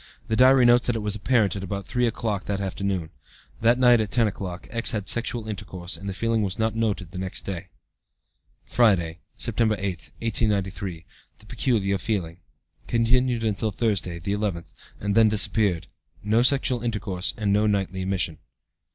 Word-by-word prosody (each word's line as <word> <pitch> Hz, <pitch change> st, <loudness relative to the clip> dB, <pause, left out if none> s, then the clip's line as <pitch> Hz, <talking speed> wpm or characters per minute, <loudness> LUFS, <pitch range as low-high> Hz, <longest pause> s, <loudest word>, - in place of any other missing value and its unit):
(The 110 Hz, -, +1 dB
diary 130 Hz, +1 st, +6 dB
notes 120 Hz, +1 st, +5 dB
that 120 Hz, -, +1 dB
it 110 Hz, -, -3 dB
was 105 Hz, 0 st, 0 dB
apparent 105 Hz, -3 st, +2 dB
at 100 Hz, -, -5 dB
about 100 Hz, 0 st, -4 dB
3 125 Hz, +3 st, 0 dB
o'clock 110 Hz, -4 st, -2 dB
that 100 Hz, -1 st, -2 dB
afternoon. 95 Hz, -3 st, -3 dB, 0.5 s
That 115 Hz, +2 st, +4 dB
night 120 Hz, -2 st, +5 dB
at 105 Hz, -, -2 dB
10 115 Hz, +4 st, +2 dB
o'clock, 95 Hz, -4 st, -5 dB
X. 115 Hz, 0 st, 0 dB
had 105 Hz, -3 st, -3 dB
sexual 120 Hz, -1 st, -1 dB
intercourse, 95 Hz, -4 st, -5 dB
and 100 Hz, -, -6 dB
the -, -, -3 dB
feeling 115 Hz, +1 st, 0 dB
was 95 Hz, -2 st, -2 dB
not 110 Hz, -1 st, 0 dB
noted 105 Hz, -6 st, -1 dB
the 90 Hz, -, -6 dB
next 95 Hz, 0 st, -3 dB
day.) 95 Hz, -1 st, -5 dB, 1.0 s
"Friday, 90 Hz, -8 st, +2 dB, 0.2 s
September 115 Hz, -1 st, +1 dB
8, 95 Hz, -4 st, -4 dB
1893. 100 Hz, -6 st, -1 dB, 0.3 s
The 110 Hz, -, -19 dB
peculiar 105 Hz, -5 st, 0 dB
feeling. 90 Hz, -6 st, -3 dB, 0.5 s
(Continued 120 Hz, +1 st, +2 dB
until 110 Hz, 0 st, 0 dB
Tuesday, 100 Hz, -5 st, -1 dB
the 90 Hz, +4 st, -3 dB
11th, 100 Hz, -5 st, -3 dB, 0.3 s
and 100 Hz, 0 st, -1 dB
then 110 Hz, 0 st, +5 dB
disappeared. 105 Hz, -4 st, +3 dB, 0.4 s
No 110 Hz, +3 st, +3 dB
sexual 130 Hz, -1 st, +2 dB
intercourse, 105 Hz, -5 st, -2 dB
and 105 Hz, -2 st, +1 dB
no 105 Hz, +1 st, +3 dB
nightly 95 Hz, -2 st, -1 dB
emission.) 95 Hz, -4 st, -2 dB
105 Hz, 170 wpm, -25 LUFS, 95-115 Hz, 1.0 s, diary